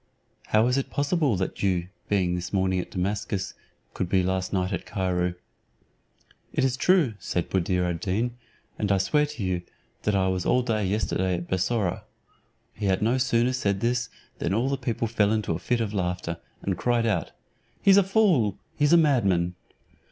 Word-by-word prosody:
How 110 +1 +4
is 125 +2 +2
it 135 - -4
possible 145 - +1
that 95 - -3
you, 90 -3 0 0.2
being 95 -4 +2
this 90 0 -4
morning 95 -1 +1
at 90 - -5
Damascus, 100 +1 -2 0.4
could 90 - -3
be 95 -1 +3
last 95 0 -1
night 95 0 0
at 90 - -4
Cairo?" 90 -2 -1 1.2
"It - - 0
is 130 -1 +2
true," 165 -4 +3
said 90 -1 -3
Buddir 90 -1 +1
ad 85 -1 -2
Deen, 115 +7 -1 0.4
"and 105 -2 0
I 100 - +4
swear 150 +11 +2
to 145 -7 -6
you, 90 -2 -1 0.4
that 105 - +1
I 95 -1 +2
was 95 -1 0
all 125 - +2
day 110 -5 0
yesterday 95 -2 0
at 85 0 -5
Bussorah." 95 0 0 0.7
He 105 -2 -3
had 95 +1 +1
no 120 +4 +2
sooner 125 0 +2
said 100 -6 0
this 120 +1 0 0.3
than 95 - 0
all 120 +5 +1
the 140 - +1
people 120 -3 -2
fell 105 -2 +2
into 110 -6 0
a 80 - -3
fit 120 +6 0
of 105 -2 -2
laughter, 90 -3 -2 0.3
and 95 -2 -2
cried 120 -1 +1
out, 110 - 0 0.5
"He's 195 -1 +7
a - - +8
fool, 185 - +3 0.2
he's 145 +2 +3
a - - +8
madman." 100 - +2
100 Hz, 185 wpm, -26 LUFS, 95-125 Hz, 1.2 s, a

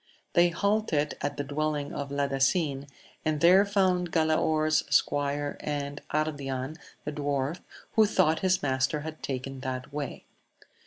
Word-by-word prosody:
They 175 0 +5
halted 200 -5 0
a 145 - +1
the 145 0 -5
dwelling 145 0 -2
of 140 -1 -4
Ladasin, 140 +1 0 0.4
and 155 -1 0
there 180 +5 +7
found 185 -4 +1
Galaor 155 -1 +2 0.2
squire 145 0 +1
and 145 -1 -4
Ardian 145 -2 -2 0.3
the 150 - -2
dwarf, 145 +2 -2 0.3
who 220 -1 +5
thought 175 -6 +3
his 185 -1 +1
mastc 130 +1 +1
had 155 +1 -7
taken 135 0 -4
that 130 +1 -5
way. 145 -2 -5
145 Hz, 130 wpm, -28 LUFS, 140-160 Hz, 0.4 s, there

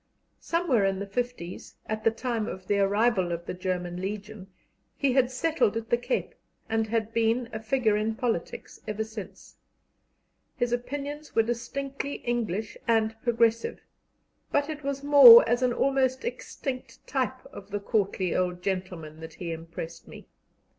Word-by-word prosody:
Somewhere 330 - +1
in 195 0 +1
the 200 - -4
fifties, 200 -4 -5
at 215 0 -4
the - - +5
time 230 -1 -2
of 185 0 -7
the 200 +1 +1
arrival 200 -2 +2
of 170 0 -4
the - - -4
German 180 -1 -3
Legion, 205 0 -6 0.5
he 275 -3 +2
had 255 -1 +3
settled 260 -5 +1
at 225 0 -6
the 240 - +5
Cape, 470 - -2 0.3
and 225 0 0
had 225 0 -1
been 230 +1 +1
a 220 - -3
figure 220 -1 +1
in 215 +1 0
politics 225 -8 -3
ever 215 +1 -2
since. 220 -2 -10 1.0
His 245 -1 -1
opinions 285 +4 -4
were 225 - +5
distinctly 270 +4 -4
English 220 -4 -2
and 225 -1 +2
progressive, 230 -1 +1 0.7
but 285 +1 +1
it 300 -1 -6
was 280 0 -3
more 270 -6 +10
as 240 +2 +2
an 250 -1 +3
almost 260 - +1
extinct 270 - -6
type 260 -1 -2
of 200 0 -10
the 205 0 -2
courtly 200 -4 0
old 180 -1 -1
gentleman 180 -5 -4
that 160 0 -9
he 170 -2 -5
impressed 165 0 -7
me. - - -12
225 Hz, 155 wpm, -27 LUFS, 195-255 Hz, 1.0 s, more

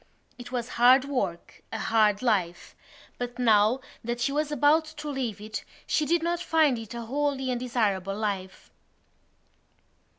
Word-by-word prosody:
It 245 - -9
was 245 -2 -2
hard 255 +2 +7
work—a 220 -5 -4
hard 215 -1 +2
life—but 220 +4 -3
now 225 +1 +3 0.2
that 240 +1 -3
she 275 - 0
was 300 +1 -1
about 295 +2 +3
to 305 -1 -9
leave 255 -8 -3
it 215 +1 -6 0.2
she 305 - 0
did 335 +2 +2
not 345 0 0
find 315 -8 +2
it 225 +1 -8
a 235 - -5
wholly 270 +1 -1
undesirable 215 -6 -1
life. 200 -3 -4
245 Hz, 135 wpm, -27 LUFS, 215-285 Hz, 0.2 s, hard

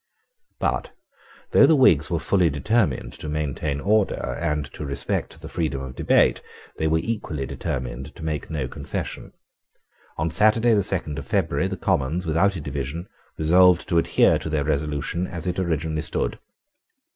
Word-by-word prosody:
But, - - -1 0.6
though 140 - +7
the 160 - +5
Whigs 95 - +5
were 85 - 0
fully 90 +1 +2
determined 80 - 0
to 75 - -7
maintain 75 -1 -2
order 105 +3 +1
and 75 -3 0
to - - -6
respect 70 +2 -3
the 80 - -9
freedom 80 -5 -2
of 65 -1 -8
debate, - - +3 0.4
they 80 - 0
were 80 +1 +3
equally 80 -8 -3
determined 65 +1 -5
to - - -10
make 75 -2 -3
no 75 -6 -2
concession. - - -5 0.9
On 80 +1 -1
Saturday 110 +6 +4
the 105 - +4
second 85 -6 -2
of - - -9
February 95 -5 +1
the 95 0 -4
Commons, 80 +6 0
without 85 +5 +2
a 85 - -4
division, 70 +5 -5 0.3
resolved 90 +2 +5
to 85 -3 +4
adhere - - +3
to - - -5
their 75 -2 0
resolution 75 +4 -1
as 85 0 -6
it 90 0 -1
originally 80 -3 -1
stood. 80 - -1
80 Hz, 160 wpm, -24 LUFS, 75-90 Hz, 0.9 s, though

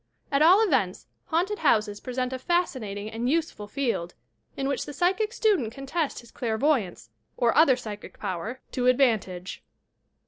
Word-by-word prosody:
At 280 +1 +2
all 365 +7 +7
events, 425 - 0 0.2
haunted 365 +6 0
houses 210 -8 +2
present 255 0 -3
a 260 - -4
fascinating 250 - -1
and 235 +3 -2
useful 315 -9 -1
field, 230 -9 -2 0.4
iu 270 - -1
which 280 - -2
the 290 - -6
psychic 385 +7 +1
student 410 - +1
can 275 +3 -9
test 310 -1 -2
his 235 - -17
clairvoyance, 220 - -1 0.3
or 235 -2 +2
other 295 -4 +6
psychic 215 -4 -8
power, 205 +6 -4
to 250 -1 0
advantage. 220 -8 +1
255 Hz, 150 wpm, -26 LUFS, 220-315 Hz, 0.4 s, all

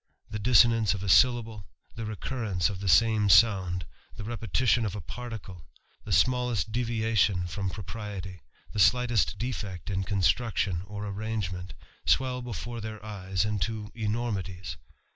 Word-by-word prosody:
The 105 - -3
dissonance 115 -1 +4
of 100 - -6
a 100 - -2
syllable, 115 - +3 0.3
the 115 -1 -5
recurrence 105 -3 -1
of 95 - -6
the 95 -1 -2
same 110 +2 +4
sound, 95 -4 +4 0.3
iie 105 - -6
repetition 120 +1 +1
of 105 -2 -2
a - - -4
particle, 100 -3 -8 0.4
the - - -6
smallest 125 -6 +2
deviation 110 -6 +1
from 95 +2 -3
propriety, 100 -3 -7 0.3
the 105 - -4
slightest 120 0 +3
defect 105 -7 -4
in 95 0 -1
construction 95 0 +1
or 105 +1 -6
arrange 105 -1 -3
ment, 90 0 -7 0.3
swell 130 -1 +2
before 120 -1 -5
their 110 -1 -7
eyes 95 -2 -2
into 105 +1 -2
enormities. 105 -5 -3
105 Hz, 140 wpm, -28 LUFS, 95-115 Hz, 0.4 s, dissonance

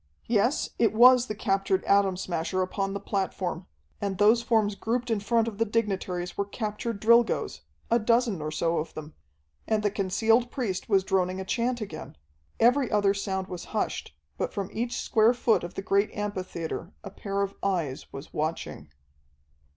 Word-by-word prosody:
Yes, 235 +5 +1
it 220 -3 +3
was 250 +1 +7
the 215 - -4
captured 195 -2 0
Atom 200 -2 +3
Smasher 185 +1 -1
upon 195 +1 -2
the - - -2
platform, 190 -3 -3 0.3
and 200 -2 -2
those 215 +4 +5
forms 220 -3 +2
grouped 235 +4 -2
in 220 - +1
front 230 +2 +1
of 215 -2 -6
the - - +4
dignitaries 195 -5 -2
were 200 - -1
captured 215 +1 -4
Drilgoes, 235 +2 +3 0.3
a 235 - +5
dozen 230 -4 +2
or 150 - -3
so 165 +2 0
of 155 - -6
them. 155 0 -8 0.5
And 215 -1 +1
the 205 - +2
concealed 220 +5 +2
priest 220 -9 -3
was 195 -3 +4
droning 185 -1 0
a 190 - -4
chant 240 +4 -1
again. 205 - -7 0.4
Every 245 +2 +4
other 205 -2 +3
sound 190 -1 -2
was 180 -2 -7
hushed, 75 - -2 0.2
but - - -1
from 195 -2 -3
each 235 +2 -2
square 225 +2 +3
foot 235 -5 +2
of 175 - -7
the 195 - -4
great 200 +1 +2
amphitheatre 185 -4 -4
a - - -8
pair 200 0 -2
of 200 0 -3
eyes 170 -9 -2
was 135 +2 -9
watching. 155 - -3
200 Hz, 175 wpm, -27 LUFS, 185-225 Hz, 0.5 s, was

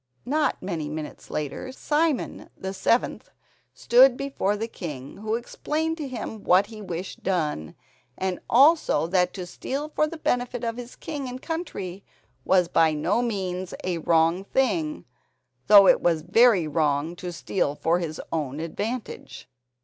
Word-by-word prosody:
Not 295 -1 0
many 165 -5 -3
minutes 155 0 -7
later, 150 - -4
Simon 300 +1 -1
the 190 0 -5
seventh 230 +5 0 0.5
stood 250 +1 +5
before 270 -7 -1
the 225 +2 -3
king, 145 - -7
who 215 +2 -2
explained 310 +7 -2
to 300 -3 -4
him 220 -4 -6
what 185 +3 +5
he 215 0 -10
wished 180 -1 -6
done, 150 - -2 0.4
and 185 -1 -2
also 290 - +5
that 180 +1 +2
to 185 - -5
steal 275 +11 -4
for 305 0 +1
the 330 - -7
benefit 245 -4 -1
of 230 0 -2
his 245 0 -8
king 290 -4 -5
and 250 +1 -6
country 200 - -5 0.4
was 180 -2 +3
by 160 -2 +3
no 170 +10 +1
means 185 -6 -3
a 180 -2 -1
wrong 165 +3 +2
thing, 195 -10 0 0.6
though 200 -2 +9
it - - +5
was 165 -3 +1
very 200 -1 +4
wrong 150 +1 0
to 180 0 -5
steal 145 0 -1
for 165 +3 +1
his 160 -3 -4
own 150 -3 -2
advantage. 210 +9 -5
190 Hz, 150 wpm, -25 LUFS, 165-245 Hz, 0.6 s, though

